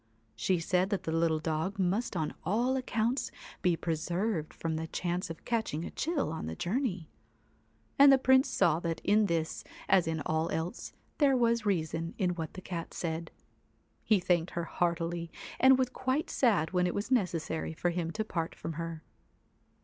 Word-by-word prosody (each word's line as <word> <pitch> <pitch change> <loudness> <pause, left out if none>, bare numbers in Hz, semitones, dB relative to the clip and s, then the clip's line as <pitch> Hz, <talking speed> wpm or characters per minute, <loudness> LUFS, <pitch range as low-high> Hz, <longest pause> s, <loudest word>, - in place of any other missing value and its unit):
She 180 +11 +1
said 180 +3 +1
that 200 -2 -1
the 160 - -2
little 165 -1 +2
dog 160 +5 -2
must 190 +2 0
on 155 -2 -1
all 235 +9 +1
accounts 245 -1 0 0.3
be 175 -2 +2
preserved 170 +2 -1
from 165 -1 -3
the 160 +1 -3
chance 175 +2 -2
of 165 - -8
catching 220 -9 -1
a - - -6
chill 310 - -1
on 160 - -4
the 80 - -4
journey; 190 - -1 0.9
and 280 0 +9
the 270 - +7
Prince 260 +1 +4
saw 160 -1 +3
that 165 -2 -2
in 210 +1 +4
this 165 -2 -1 0.2
as 180 -4 +4
in 160 -1 -1
all 160 +1 0
else, 165 +7 -3 0.3
there 275 -3 +5
was 235 -2 +2
reason 165 -3 -1
in 185 -4 +1
what 165 -3 -5
the 185 - -7
Cat 170 -3 -6
said. 165 -1 -3 0.7
He 215 -3 +4
thanked 175 -1 +1
her 170 - -2
heartily, 170 0 -1 0.3
and 260 0 +7
was 260 -1 +1
quite 260 +5 -1
sad 200 - +2
when 180 -1 +2
it 175 - -2
was 205 +5 -3
necessary 170 -8 0
for 175 +2 0
him 170 -1 -2
to 215 +6 -3
part 165 -6 -3
from 165 - -5
her. 165 0 -5
175 Hz, 180 wpm, -31 LUFS, 165-220 Hz, 0.9 s, and